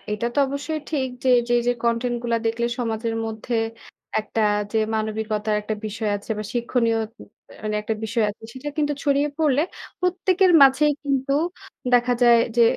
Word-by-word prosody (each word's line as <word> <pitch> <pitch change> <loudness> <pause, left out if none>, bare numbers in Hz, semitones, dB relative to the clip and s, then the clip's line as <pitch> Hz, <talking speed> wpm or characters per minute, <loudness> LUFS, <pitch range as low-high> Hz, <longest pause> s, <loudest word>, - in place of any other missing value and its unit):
এটা 210 +3 -1
তো - - 0
অবশ্যই 285 +3 -3
ঠিক 270 -4 0 0.2
যে, - - +2 0.2
যে 240 - +3
যে 245 - +4
কনটেন্ট 235 +1 0
গুলা 235 -1 0
দেখলে 235 +1 0
সমাজের 225 -1 -2
মধ্যে 220 +2 -4 0.7
একটা 215 +1 -3 0.3
যে 220 - +2 0.2
মানবিকতার 215 -1 -1
একটা 215 +1 -2
বিষয় 215 0 -2
আছে 205 +2 -12
বা 215 - -4
শিক্ষণীয় 235 -1 +1 0.8
একটা 220 - -2
বিষয় 225 0 0
আছে, 205 - -15
সেটা 275 +3 -6
কিন্তু 295 -1 +1
ছড়িয়ে 285 +1 +2
পড়লে 295 -3 +3 0.4
প্রত্যেকের 365 +1 +3
মাঝেই 285 +2 +5
কিন্তু 275 -1 0 0.6
দেখা 245 0 +4
যায় 235 -1 +7 0.2
যে, 235 - +6
240 Hz, 155 wpm, -23 LUFS, 220-280 Hz, 0.8 s, যায়